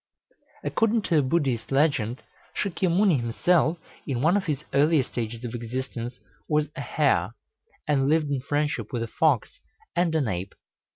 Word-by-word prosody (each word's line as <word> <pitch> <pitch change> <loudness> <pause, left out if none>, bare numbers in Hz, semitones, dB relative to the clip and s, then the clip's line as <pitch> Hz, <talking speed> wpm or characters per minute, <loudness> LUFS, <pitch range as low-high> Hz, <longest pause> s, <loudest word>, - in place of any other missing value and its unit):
According 225 -1 +1
to 165 -5 +3
a - - +4
Buddhist 130 -5 0
legend, 135 -5 +1 0.4
Sâkyamunni 185 -4 +2
himself, 160 +8 +2 0.3
in 130 -3 -1
one 165 +5 +4
of 205 - +1
his 150 -2 -2
earlier 150 0 +4
stages 115 -1 -5
of 120 - -5
existence, 120 +1 -5 0.3
was 150 -1 +2
a - - -4
hare, 140 -5 +1 0.5
and 140 -2 +2
lived 155 -2 +2
in 135 -2 0
friendship 145 -5 -1
with 120 -2 -2
a - - -4
fox - - +1 0.4
and 170 -2 +2
an 145 -6 +2
ape. 95 -1 -4
140 Hz, 155 wpm, -26 LUFS, 120-160 Hz, 0.5 s, a